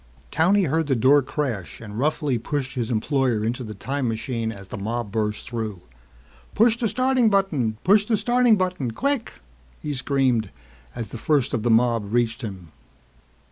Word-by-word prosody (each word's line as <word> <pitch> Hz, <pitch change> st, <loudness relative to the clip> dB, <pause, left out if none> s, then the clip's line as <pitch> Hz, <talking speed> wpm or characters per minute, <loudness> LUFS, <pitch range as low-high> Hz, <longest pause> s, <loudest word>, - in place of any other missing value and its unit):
Towney 190 Hz, +6 st, +3 dB
heard 160 Hz, -1 st, 0 dB
the 135 Hz, -, +2 dB
door 135 Hz, +5 st, +5 dB
crash 130 Hz, -, -4 dB
and 110 Hz, -1 st, -7 dB
roughly 145 Hz, -3 st, 0 dB
pushed 135 Hz, +2 st, -3 dB
his 120 Hz, -4 st, -2 dB
employer 120 Hz, -1 st, 0 dB
into 125 Hz, +3 st, -2 dB
the 105 Hz, -2 st, -7 dB
time 135 Hz, +5 st, -2 dB
machine 115 Hz, 0 st, -2 dB
as 100 Hz, -3 st, -11 dB
the -, -, -6 dB
mob 115 Hz, +1 st, -3 dB
burst 105 Hz, -1 st, -2 dB
through. 110 Hz, -6 st, -4 dB, 0.7 s
"Push 230 Hz, +1 st, +4 dB
the 230 Hz, -, +1 dB
starting 255 Hz, +2 st, +2 dB
button, 155 Hz, -, +1 dB
push 205 Hz, +2 st, +4 dB
the 220 Hz, 0 st, +1 dB
starting 240 Hz, +2 st, +4 dB
button. 185 Hz, -, -1 dB
Quick!" 280 Hz, -, -1 dB, 0.5 s
he 150 Hz, -, -4 dB
screamed 130 Hz, -5 st, +1 dB, 0.5 s
as 115 Hz, -4 st, -5 dB
the 120 Hz, -, -7 dB
first 140 Hz, -2 st, +1 dB
of 120 Hz, -, 0 dB
the 120 Hz, -, 0 dB
mob 115 Hz, -2 st, +2 dB
reached 120 Hz, +1 st, 0 dB
him. 95 Hz, -8 st, -7 dB
130 Hz, 170 wpm, -23 LUFS, 110-160 Hz, 0.7 s, door